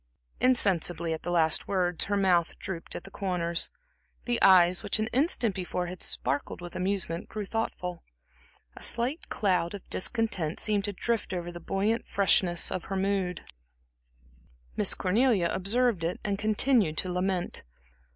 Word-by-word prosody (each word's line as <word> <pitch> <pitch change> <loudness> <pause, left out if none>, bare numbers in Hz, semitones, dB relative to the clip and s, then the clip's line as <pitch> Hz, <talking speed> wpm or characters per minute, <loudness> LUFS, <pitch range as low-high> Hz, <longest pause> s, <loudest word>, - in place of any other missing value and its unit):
Insensibly 180 -9 +2
at 160 - -5
the 175 - -5
last 165 -2 +2
words, 180 -3 0
her 205 0 0
mouth 180 -4 +2
drooped 170 -3 -6
at - - -6
the 195 - -12
corners, 175 -3 -1 0.6
the 240 -1 -1
eyes, 180 -2 +6
which - - -1
an 215 - 0
instant 255 - +3
before 180 -1 -3
had 180 0 -7
sparkled 140 - -2
with 175 -1 -9
amusement, 185 -2 -2
grew 210 -1 -5
thoughtful. 180 -5 -4 0.7
A - - -12
slight 250 +7 0
cloud 185 -2 0
of 200 - -11
discontent 185 -7 -1
seemed 205 -2 +1
to 205 - -2
drift 230 0 -2
over 175 -1 -4
the 175 - -8
buoyant 205 +6 -1
freshness 180 -3 +3
of 185 - -3
her 195 - -3
mood. 190 -2 -1 1.3
Miss - - +4
Cornelia 205 -2 +2
observed 210 0 +1
it 170 +2 -2
and 200 -1 -2
continued 215 - +2
to 185 - -2
lament. 180 0 -1
190 Hz, 150 wpm, -28 LUFS, 175-210 Hz, 1.3 s, eyes